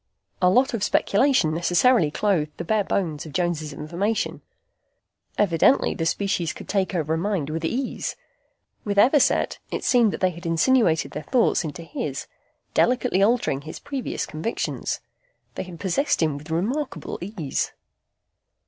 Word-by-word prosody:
A 180 - +5
lot 255 +7 +3
of 220 -4 -1
speculation 205 - +3
necessarily 175 +3 +3
clothed 155 -3 0
the - - -4
bare 210 +4 +1
bones 160 -6 -2
of 150 - -11
Jones' 170 -3 -1
information. 190 +10 -2 1.0
Evidently 200 - +3
the 165 - -2
species 190 -3 0
could - - -10
take 195 -1 0
over 160 -2 0
a - - +1
mind 175 -6 -1
with 160 +1 -3
ease. 250 +10 -2 0.7
With 200 -1 -2
Everset, 265 +7 +4
it - - -4
seemed 235 -4 +4
that - - -5
they 185 -1 +2
had 170 +1 -8
insinuated 165 0 +3
their 150 - -5
thoughts 235 +1 +2
into 160 +1 -6
his, 145 -3 -4 0.5
delicately 250 -5 +2
altering 210 - +2
his 155 +2 -8
previous 280 -3 -4
convictions. 160 +10 -3 0.5
They - - -4
had 180 -3 -9
possessed 240 - +1
him 155 -3 +1
with 150 +3 -10
remarkable 235 - -2
ease. 175 -7 -3
185 Hz, 150 wpm, -24 LUFS, 160-225 Hz, 1.0 s, A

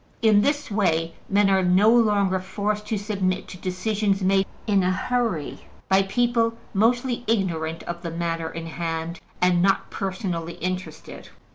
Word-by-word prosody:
In 215 -2 +6
this 290 0 0
way, 165 -5 +1 0.2
men 205 0 +4
are 190 -1 +3
no 185 +5 +5
longer 205 -5 +3
forced 210 +2 -3
to 215 - -1
submit 200 -3 -2
to 185 - -8
decisions 195 +2 -1
made 195 +1 +3 0.2
in 200 -3 +3
a 180 - +1
hurry 210 - -2 0.2
by 190 0 +5
people 230 +2 +1 0.2
mostly 240 +4 +1
ignorant 165 -7 -1
of 170 0 -6
the 170 - -4
matter 165 -1 -2
in 165 0 -7
hand 165 0 -4 0.2
and 180 -1 +4
not 195 +1 +1
personally 185 -4 -3
interested. 185 +2 -6
195 Hz, 150 wpm, -24 LUFS, 175-215 Hz, 0.2 s, In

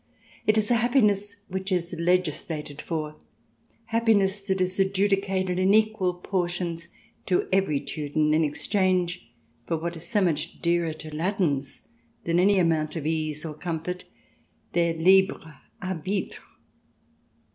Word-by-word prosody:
It 215 +1 +4
is 215 +1 +1
a 240 - +5
hap 240 +1 0
piness 205 -5 +2
which 190 +1 -4
is 175 -1 -1
legislated 165 -4 -1
for, 155 -2 -4 0.7
happiness 215 -4 +3
that 190 -1 -1
is 185 +1 -1
adjudicated 195 -1 +1
in 190 +2 +4
equal 215 -5 +2
portions 175 -2 -2 0.4
to 180 - +1
every 190 -7 +2
Teuton 150 +1 -1
in 160 +1 +3
exchange 175 - 0 0.4
for 165 - 0
what 170 +2 -4
is 165 +1 -10
so 220 -3 +1
much 160 -5 -1
dearer 170 -1 +1
to 155 -1 -8
Latins 155 -6 -1 0.4
than 170 +1 +1
any 200 +2 +4
amount 160 -3 +1
of 155 -3 -4
ease 155 -1 -1
or 155 - -4
comfort 175 +2 -4 0.3
— - - -39
their 170 -1 +2
libre 180 -2 +3 0.2
arbitre. 185 +2 -3
180 Hz, 135 wpm, -26 LUFS, 160-195 Hz, 0.7 s, a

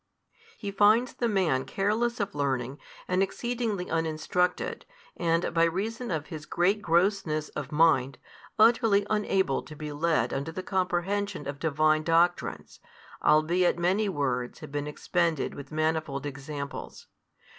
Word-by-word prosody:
He 200 -2 -5
finds 210 +5 +4
the 240 - -1
man 180 - +1
careless 215 - 0
of 200 -1 -2
learning 135 -2 -2 0.3
and 180 +1 +1
exceedingly 225 -2 -2
uninstructed 165 +2 -1 0.3
and, 165 0 0
by 165 0 +4
reason 220 +8 -2
of 155 -4 -2
his 155 -3 -8
great 195 +4 +1
grossness 170 -3 +1
of 140 0 -6
mind, 150 -4 +3 0.4
utterly 220 -2 +4
unable 195 -7 +1
to 155 - -11
be 150 0 -6
led 160 +2 +1
unto 140 +4 -3
the 185 +3 -6
comprehension 185 -2 -1
of 140 0 -5
Divine 155 0 +2
doctrines, 165 +2 0 0.4
albeit 170 +4 +3
many 190 +5 +1
words 130 -7 -2
had - - -9
been 145 0 -3
expended 165 0 -1
with 140 +1 -10
manifold 155 -2 -1
examples. 140 0 -6
165 Hz, 135 wpm, -28 LUFS, 150-195 Hz, 0.4 s, finds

